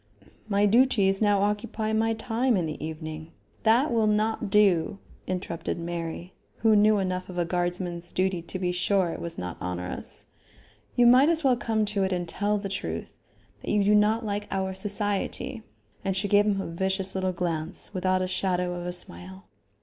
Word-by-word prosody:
"My 200 0 +3
duties 205 -3 +3
now 205 -2 +3
occupy 215 +1 -1
my 225 +1 +1
time 235 +1 0
in 175 - 0
the 155 -1 -5
evening 155 0 -6 0.2
" - - -35
"That 245 +6 +4
will 225 -2 +3
not 215 0 0
do," 195 -2 +3 0.3
interrupted 180 -3 -3
Mary, 170 +1 -5 0.2
who 220 0 +4
knew 210 +1 +5
enough 185 -1 -2
of 180 - -7
a 175 - +1
guardsman's 175 0 -2
duty 185 -1 0
to 170 +3 -5
be 180 -1 -1
sure 180 0 +1
it - - -6
was 170 -1 -5
not 90 -1 -6
onerous. 90 0 -5 0.7
"You 245 - +5
might 255 +5 +7
as 330 -1 +2
well 260 -2 +4
come 220 -2 0
to 205 -1 0
it 190 - 0
and 175 -1 -2
tell 205 +4 0
the 200 -1 -4
truth; 195 - -4 0.5
that - - -6
you 205 -1 +3
do 205 +1 +4
not 215 +2 +3
like 205 0 -3
our 190 -1 -2
society." 205 +5 -2 0.4
And 195 -1 -1
she 200 +2 0
gave 205 +1 +4
him 200 -2 +1
a - - -3
vicious 190 +3 0
little 185 -1 0
glance 170 +1 -3
without 185 0 +1
a - - -1
shadow 180 -1 -1
of 175 0 -5
a 180 - -2
smile. 95 - -1
190 Hz, 190 wpm, -26 LUFS, 175-210 Hz, 0.7 s, might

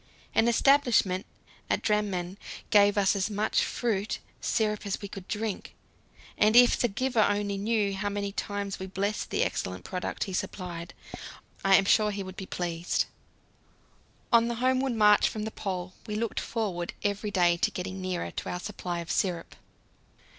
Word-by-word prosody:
An 225 - +4
establishment 235 -7 +3 0.4
at - - 0
Drammen 200 -4 -1 0.3
gave 205 -1 +5
us 200 0 +3
as 195 +1 0
much 210 +1 +1
fruit 215 -4 -1 0.2
syrup 210 -2 0
as 195 - -2
we 200 - -6
could 195 -2 -9
drink, 215 -2 -4 0.6
and 215 +2 +4
if 245 0 +8
the 240 - +1
giver 240 +2 0
only 205 -1 +1
knew 205 0 0
how 200 +1 -2
many 200 0 -3
times 200 -1 -4
we 190 - -5
blessed 200 +2 -2
the - - +1
excellent 90 0 -3
product 180 -1 -3
he 190 - -5
supplied, 175 -2 -4 0.7
I 195 0 +6
am 195 - +4
sure 210 +1 +4
he 200 -1 -3
would 185 0 -9
be 190 - -7
pleased. 175 -1 -1 1.3
On 230 0 +6
the 235 - -2
homeward 260 +2 +1
march 210 -2 +5
from 215 - -4
the 220 - -4
Pole 185 -3 -4
we 210 - -3
looked 225 0 -1
forward 190 -7 -3
every 205 +1 -1
day 175 -3 +3
to - - +2
getting 190 +1 -5
nearer 185 -1 -3
to - - -5
our 180 - -3
supply 180 -3 -4
of 170 - -5
syrup. 175 -4 -1
200 Hz, 170 wpm, -28 LUFS, 185-215 Hz, 1.3 s, if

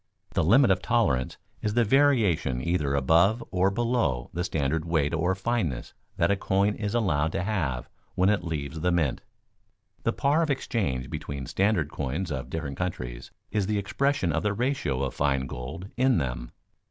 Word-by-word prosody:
The - - +1
limit 115 - +5
of 95 -1 +2
tolerance 100 - +1 0.2
is 105 0 -1
the 120 - +4
variation 110 - +3
either 75 -2 0
above 85 - +3
or 90 +1 +3
below 115 - 0
the 90 - -1
standard 80 -2 -1
weight 80 -2 0
or 90 +3 +1
fineness 95 - -2 0.2
that - - +3
a - - +3
coin 100 +1 +1
is 105 +1 -3
allowed 80 -9 +1
to - - -1
have 75 - -2 0.3
when 95 - +3
it 105 -3 +1
leaves 80 -1 -4
the 90 +3 +1
mint. 80 -7 +1 0.8
The - - +1
par 145 +4 +2
of 160 - 0
exchange 80 - -1
between 70 -2 -5
standard 95 - +1
coins 75 +5 -3
of 65 -2 -4
different 70 -3 -4
countries 60 -10 -4 0.2
is 105 -3 0
the 105 0 0
expression 120 0 0
of 80 - 0
the 105 +3 0
ratio 105 - -1
of 65 - -2
fine 70 -2 +1
gold 75 +10 -7
in 130 -1 +3
them. - - -3
85 Hz, 175 wpm, -27 LUFS, 70-105 Hz, 0.8 s, limit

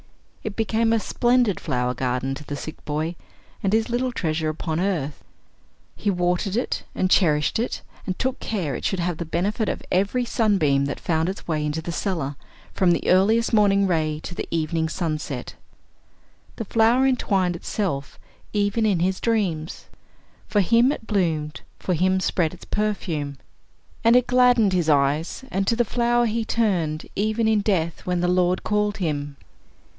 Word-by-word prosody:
It 215 -2 -4
became 225 0 +1
a 230 - +3
splendid 240 -2 +2
flower 125 -4 -1
garden 125 +1 -1
to 145 - -7
the 145 - -5
sick 155 +2 -8
boy, 155 +3 -2 0.5
and 195 - 0
his 220 +1 +2
little 250 +2 0
treasure 160 -7 -1
upon 155 +1 -3
earth. 165 -7 -2 0.7
He 205 - -1
watered 180 +2 0
it, 245 - -1
and 185 0 0
cherished 150 +1 +3
it, 235 - -2 0.2
and 185 - -2
took 260 0 -1
care 180 -11 -2
it - - -5
should 190 - 0
have 175 -1 -1
the 170 - -4
benefit 200 +7 -1
of - - -4
every 200 +7 +1
sunbeam 190 - +2
that 140 - -4
found 160 0 0
its 195 - -7
way 155 -3 0
into 150 +2 -2
the 170 - -4
cellar, 165 -6 -2 0.4
from 185 - +2
the 170 - 0
earliest 220 +6 +3
morning 200 -2 +4
ray 155 -4 0
to - - -6
the - - -5
evening 160 0 -1
sunset. 155 -7 -3 1.0
The 225 - -5
flower 230 +5 +3
entwined 195 -9 +1
itself 165 -6 -3 0.4
even 205 +2 +1
in 190 -5 +1
his 185 +1 +1
dreams 185 -9 -1 0.6
for 205 - +2
him 230 +7 +4
it 260 - -5
bloomed, 160 -8 -1 0.2
for 185 - -2
him 185 +3 +2
spread 180 -2 0
its - - -14
perfume. 170 -9 -2 0.7
And 230 +1 +6
it 250 -1 +5
gladdened 245 -5 +4
his 175 -3 +1
eyes, 150 - +1
and 195 0 -1
to 230 - +3
the 240 0 +2
flower 240 +2 +2
he 225 0 0
turned, 180 -10 0
even 220 +2 +1
in 220 -1 +3
death, 170 -6 -1
when 180 -1 0
the 180 - +1
Lord 180 0 +2
called 210 0 0
him. 145 -6 -3
185 Hz, 170 wpm, -23 LUFS, 155-220 Hz, 1.0 s, And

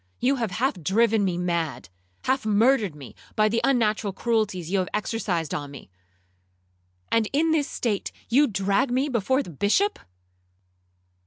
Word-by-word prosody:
You 270 +3 +2
have 230 -3 -1
half 210 0 -1
driven 215 +5 +2
me 180 -3 0
mad!—half 160 - -3
murdered 215 - +2
me, 135 -7 -11 0.2
by 215 0 +4
the 230 +2 0
unnatural 220 -6 +1
cruelties 205 -6 -1
you 195 - +2
have 185 - -2
exercised 205 -6 -2
on 145 -1 -4
me!—and 90 - -7
in 320 +3 +2
this 300 -3 +1
state 215 -5 -2 0.2
you 280 +6 +4
drag 200 +4 +1
me 260 +4 0
before 260 +3 +1
the 175 - -10
Bishop! 210 - +1
200 Hz, 140 wpm, -25 LUFS, 145-235 Hz, 0.2 s, by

